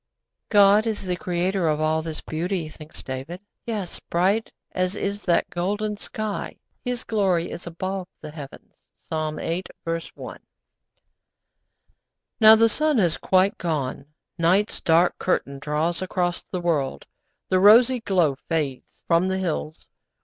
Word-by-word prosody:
'God 205 +1 +6
is 215 -2 -2
the 180 -1 -1
Creator 180 0 -1
of 155 -1 +1
all 155 +1 +1
this 160 -1 -6
beauty,' 170 +1 -3
thinks 155 0 -12
David. 135 +7 -6 0.3
'Yes, 205 -6 -4
bright 195 +6 0 0.2
as 185 +1 -1
is 200 0 -3
that 170 -2 +2
golden 205 +4 -1
sky, 215 0 -5 0.3
His 250 -1 -3
glory 190 -6 +1
is 170 - -8
above 185 +2 -4
the 150 - -8
heavens.' 145 -3 -12
(Psalm 155 -1 -3
viii. 170 +2 -2 0.2
1.) 165 0 -5 2.0
Now 220 -1 +9
the 225 +1 +5
sun 305 +5 +1
has 175 -6 +2
quite 190 +2 +2
gone; 140 -5 -2 0.3
night's 185 +6 +2
dark 170 +2 +3
curtain 140 -6 -1
draws 155 +5 -1
across 180 -1 -1
the 180 - -5
world, 155 -6 -1 0.4
the 185 - +3
rosy 235 +6 +7
glow 175 - +1
fades 150 -6 -3
from 170 +2 +3
the 190 0 0
hills. 160 -4 -3
180 Hz, 135 wpm, -24 LUFS, 160-200 Hz, 2.0 s, Now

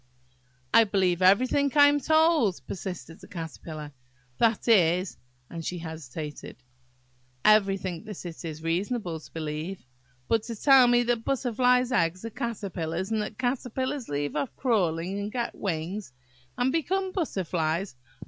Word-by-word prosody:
"I 230 - +8
believe 190 -4 +1
everything 255 +9 +4
that 295 - -5
I 285 - +9
am 290 0 +3
told," 315 - +3
persisted 170 -5 -7
the - - -13
Caterpillar; 160 -4 -7 0.5
"that 230 -1 +2
is"–and 165 - +1
she 180 - -3
hesitated,–"everything 145 - -3
that 210 -4 -8
it 170 0 -7
is 160 -1 -6
reasonable 175 +1 -1
to - - -15
believe. 160 +3 -5 0.4
But 225 - +2
to 235 - -5
tell 265 +2 +6
me 240 0 +4
that 240 -1 0
butterflies' 250 -1 +2
eggs 175 +1 +1
are 230 - -5
caterpillars, 190 -5 -4
and 220 -1 +1
that 210 - -6
caterpillars 260 +1 -2
leave 145 0 -2
off 275 - -2
crawling 190 -6 0
and 205 +1 -4
get 240 -1 -2
wings, 180 -2 -4 0.4
and 250 +2 +2
become 370 +5 0
butterflies! 180 - -2
195 Hz, 135 wpm, -27 LUFS, 160-240 Hz, 0.5 s, I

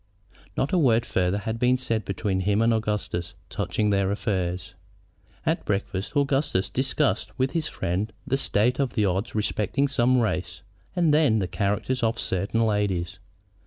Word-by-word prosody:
Not 135 - 0
a 180 - +4
word 120 -6 +3
farther 90 +1 +1
had 110 +3 -3
been 125 +1 +3
said 115 -5 -2
between 95 0 -1
him 100 +3 +2
and 115 0 +4
Augustus 105 -5 -2 0.2
touching 105 -1 0
their 100 -1 +2
affairs. 95 -3 -2 0.7
At - - +1
breakfast 100 +5 -2
Augustus 140 -8 +1
discussed 135 +2 0
with 130 0 +1
his 165 -2 -1
friend 95 +5 -2
the 135 - +1
state 125 -2 +1
of 135 -3 0
the 105 -3 +2
odds 95 +4 -1
respecting 110 +6 0
some 130 -1 +3
race 110 -5 -2 0.3
and 170 -4 +3
then 150 -8 +4
the 95 -4 0
characters 100 +8 -1
of 115 0 +1
certain 100 +5 0
ladies. 100 -3 -1
110 Hz, 160 wpm, -25 LUFS, 95-130 Hz, 0.7 s, a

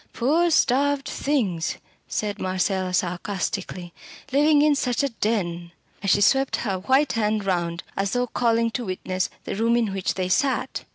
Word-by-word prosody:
"Poor 315 +8 +2
starved 280 -1 +2
things!" 205 - -1 0.3
said 205 -1 -3
Marcella 185 0 -1
sarcastically 180 0 -3 0.4
"living 295 +2 +4
in 300 -1 +5
such 255 -1 0
a 280 - +1
den!" 180 -7 -2 0.3
And 200 - -1
she 205 - +4
swept 270 +6 +3
her 195 -3 -1
white 265 +8 +2
hand 215 -2 0
round, 170 -2 -1
as 195 0 -1
though 245 0 +1
calling 230 -1 +1
to 240 +2 -3
witness 185 -1 -2
the - - -4
room 230 +3 +2
in 225 -5 0
which 195 -1 -1
they 185 -1 -1
sat. 265 +8 0
210 Hz, 160 wpm, -24 LUFS, 185-260 Hz, 0.4 s, in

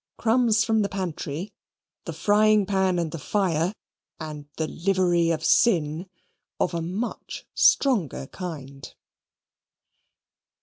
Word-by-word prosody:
"Crumbs 225 -1 +3
from 225 -1 +2
the 200 - 0
Pantry," 180 -2 -4 0.5
"The - - -5
Frying 210 0 +3
Pan 190 -2 +1
and 170 -2 -1
the 165 - -6
Fire," 175 0 0 0.5
and 150 -2 -7
"The 160 - 0
Livery 175 -1 +1
of 160 -1 -1
Sin," 170 -6 +2 0.5
of 180 - 0
a 170 - -2
much 190 +8 -5
stronger 210 - +2
kind. 140 -6 -8
180 Hz, 115 wpm, -25 LUFS, 160-205 Hz, 0.5 s, Crumbs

